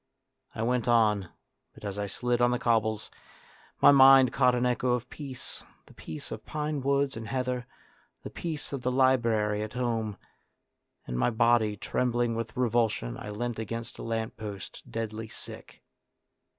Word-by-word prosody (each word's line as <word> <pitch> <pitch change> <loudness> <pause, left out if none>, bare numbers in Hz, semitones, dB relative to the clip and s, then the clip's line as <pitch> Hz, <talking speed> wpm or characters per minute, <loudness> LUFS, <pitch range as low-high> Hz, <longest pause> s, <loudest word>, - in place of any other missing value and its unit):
I 110 - -2
went 125 0 0
on, 105 -6 +3 0.5
but - - -11
as 100 0 -4
I 100 - -1
slid 120 +4 -1
on 120 - +5
the 125 - +1
cobbles, 110 -3 0 0.7
my - - +10
mind 135 -2 +8
caught 125 0 +4
an 125 0 +1
echo 125 0 +1
of 125 0 -2
peace, 135 -4 -8 0.2
the - - -18
peace 80 -2 -8
of - - -6
pine 150 -1 -3
woods 140 0 +1
and 110 0 -6
heather, 125 -1 -2 0.6
the - - -7
peace 160 -4 -5
of 135 - -3
the 125 - 0
library 115 -5 +2
at 110 0 -5
home, 115 -4 -1 0.9
and, 60 0 -3
my - - +3
body 115 -2 +3
trembling 120 +2 0
with 115 +1 -4
revulsion, 115 - +1
I 105 - -7
leant 115 +2 -3
against 115 +2 -5
a - - -6
lamp 115 -1 -3
post, 105 -3 -7
deadly 110 0 -4
sick. - - -11
120 Hz, 165 wpm, -28 LUFS, 110-125 Hz, 0.9 s, my